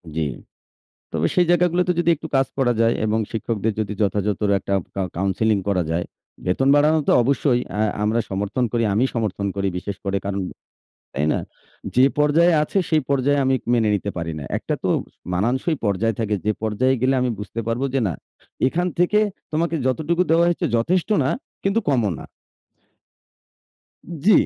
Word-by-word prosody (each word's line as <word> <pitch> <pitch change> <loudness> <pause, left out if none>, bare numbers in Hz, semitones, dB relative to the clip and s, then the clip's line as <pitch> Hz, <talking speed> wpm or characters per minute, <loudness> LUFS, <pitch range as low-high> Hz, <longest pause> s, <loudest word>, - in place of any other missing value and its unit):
জি। 80 - 0 0.9
তবে 80 0 +1
সেই 180 -2 +4
জায়গাগুলোতে 180 +1 +3
যদি 170 0 +2
একটু 160 - -8
কাজ 135 0 +3
করা 125 -3 +3
যায় 115 0 +3
এবং 110 +1 +1
শিক্ষকদের 110 -1 -1
যদি 105 -1 -2
যথাযথর 105 0 0
একটা 100 - -5 0.2
কা 100 - -1
কাউন্সেলিং 100 +3 +1
করা 95 -3 +2
যায়, 85 +2 0 0.4
বেতন 95 +9 +1
বাড়ানো 150 +2 +4
তো - - +6
অবশ্যই 130 -1 +2
অ্যা 105 - -1 0.2
আমরা 110 +2 +2
সমর্থন 100 +6 -1
করি, 120 -1 +1
আমি 115 +5 +3
সমর্থন 105 -4 -1
করি 100 0 0
বিশেষ 100 +1 -5
করে 100 0 0
কারণ, 100 0 -2 0.7
তাই 75 +3 0
না? - - 0 0.6
যে, 125 - +6
পর্যায়ে 160 +4 +4
আছে 175 - 0
সেই 155 -3 +3
পর্যায়ে 140 +1 +2
আমি 130 0 +3 0.2
মেনে 110 -2 +2
নিতে 100 0 -2
পারি 80 -1 -3
না। 70 - -7
একটা - - -3
তো - - +1 0.5
মানানসই 130 - 0
পর্যায় 105 +3 +1
থাকে। 105 -1 0
যে 105 - +3
পর্যায়ে 115 +5 +1
গেলে 130 +2 +2
আমি 125 -1 +1
বুঝতে 105 +2 -5
পারবো 120 +4 -1
যে, 135 - +2
না, 85 - -2 0.5
এখান 175 +6 0
থেকে 180 +4 +3 0.3
তোমাকে 165 +1 0
যতটুকু 160 +7 +1
দেওয়া 170 +1 +5
হচ্ছে 175 - 0
যথেষ্ট 175 +10 +1
না 130 - +1 0.3
কিন্তু 195 +3 +1
কমও 120 -7 +2
না। - - -9 2.0
জি, 215 - +7
120 Hz, 170 wpm, -22 LUFS, 100-150 Hz, 2.0 s, জি